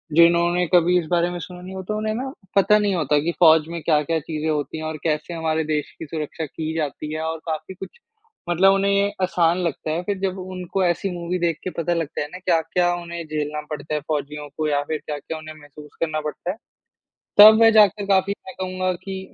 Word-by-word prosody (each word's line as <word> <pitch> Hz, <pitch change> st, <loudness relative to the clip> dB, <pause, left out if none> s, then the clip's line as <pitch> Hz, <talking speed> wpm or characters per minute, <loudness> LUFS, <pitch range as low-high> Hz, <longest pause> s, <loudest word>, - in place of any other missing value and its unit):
जिन्होंने 170 Hz, +1 st, +4 dB
कभी 180 Hz, +1 st, +5 dB
इस 165 Hz, -, -4 dB
बारे 175 Hz, 0 st, +2 dB
में 175 Hz, 0 st, -5 dB
सुना 180 Hz, +2 st, -9 dB
नहीं 185 Hz, +1 st, -9 dB
होता 190 Hz, +3 st, -4 dB
उन्हें 215 Hz, 0 st, -1 dB
ना 265 Hz, +3 st, -4 dB, 0.2 s
पता 205 Hz, +2 st, +5 dB
नहीं 205 Hz, -2 st, +1 dB
होता 150 Hz, -3 st, +2 dB
कि 165 Hz, +4 st, -1 dB
फ़ौज 160 Hz, -2 st, +6 dB
में 170 Hz, -1 st, -5 dB
क्या-क्या 160 Hz, +1 st, +1 dB
चीज़ें 155 Hz, +1 st, -4 dB
होती 150 Hz, +1 st, -2 dB
हैं 155 Hz, -, -6 dB
और 155 Hz, 0 st, -4 dB
कैसे 155 Hz, +1 st, -1 dB
हमारे 160 Hz, -1 st, -1 dB
देश 150 Hz, -1 st, -2 dB
की 160 Hz, -, -6 dB
सुरक्षा 155 Hz, +1 st, -4 dB
की 160 Hz, +2 st, -5 dB
जाती 150 Hz, 0 st, -3 dB
है। 155 Hz, -, -3 dB
और 160 Hz, 0 st, -2 dB
काफ़ी 155 Hz, +3 st, -4 dB
कुछ 190 Hz, -, -10 dB, 0.5 s
मतलब 190 Hz, +3 st, +5 dB
उन्हें 195 Hz, 0 st, +2 dB
ये 200 Hz, 0 st, +2 dB
आसान 175 Hz, -2 st, +2 dB
लगता 160 Hz, -1 st, -2 dB
है 165 Hz, +2 st, -1 dB
फिर 200 Hz, +1 st, -2 dB
जब 190 Hz, -1 st, -2 dB
उनको 185 Hz, 0 st, -3 dB
ऐसी 175 Hz, +3 st, 0 dB
मूवी 175 Hz, +1 st, -3 dB
देख 170 Hz, -2 st, 0 dB
के 185 Hz, -, -2 dB
पता 170 Hz, +1 st, 0 dB
लगता 165 Hz, -3 st, -3 dB
है 145 Hz, -, -3 dB
ना 185 Hz, -, -7 dB
क्या-क्या 175 Hz, +1 st, +2 dB
उन्हें 170 Hz, -1 st, -6 dB
झेलना 150 Hz, -1 st, -3 dB
पड़ता 150 Hz, 0 st, -5 dB
है -, -, 0 dB
फ़ौजियों 150 Hz, 0 st, -4 dB
को 155 Hz, -1 st, 0 dB
या 145 Hz, -1 st, +1 dB
फिर 155 Hz, -, 0 dB
क्या-क्या 150 Hz, +2 st, -5 dB
उन्हें 155 Hz, 0 st, -9 dB
महसूस 150 Hz, +1 st, -13 dB
करना 155 Hz, -2 st, -1 dB
पड़ता 155 Hz, +4 st, -4 dB
है, 205 Hz, -, -9 dB, 0.8 s
तब 215 Hz, +2 st, +10 dB
वे 225 Hz, -, +8 dB
जा 215 Hz, -1 st, +8 dB
के 200 Hz, +1 st, -7 dB
काफ़ी 195 Hz, 0 st, +2 dB
मैं 185 Hz, -, -8 dB
कहूँगा 185 Hz, 0 st, -1 dB
कि 190 Hz, -1 st, -5 dB
170 Hz, 225 wpm, -22 LUFS, 155-185 Hz, 0.8 s, तब